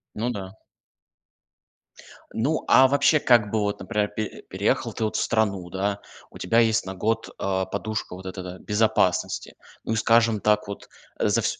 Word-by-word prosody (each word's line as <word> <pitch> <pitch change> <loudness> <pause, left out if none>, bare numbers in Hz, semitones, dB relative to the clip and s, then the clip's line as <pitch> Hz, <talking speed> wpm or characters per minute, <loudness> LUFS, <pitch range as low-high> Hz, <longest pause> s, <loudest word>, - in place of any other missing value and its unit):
Ну 115 +3 -1
да. 95 -3 -7 1.8
Ну, 140 +8 -1
а 130 0 +7
вообще, 145 +3 +3
как 120 -6 +3
бы, 110 - +1
вот, 100 0 -1
например, 105 +2 -1
пе 110 0 -5
переехал - - 0
ты 110 - -3
вот 110 - -1
в - - +1
страну, 100 -5 0
да, 100 +3 -2 0.3
у - - -11
тебя 115 +6 +2
есть 110 -3 +2
на 95 - -5
год, 110 +4 -1
а, 95 -1 -1
подушка 105 -1 -4
вот 95 +1 -11
эта, 95 0 -6
да, 90 0 -7
безопасности. 105 -5 0 0.3
Ну 110 - -2
и, - - 0
скажем 115 0 +3
так, 105 0 +2
вот 100 - -8 0.3
за 105 +3 +2
всь - - -2
105 Hz, 175 wpm, -24 LUFS, 95-115 Hz, 1.8 s, а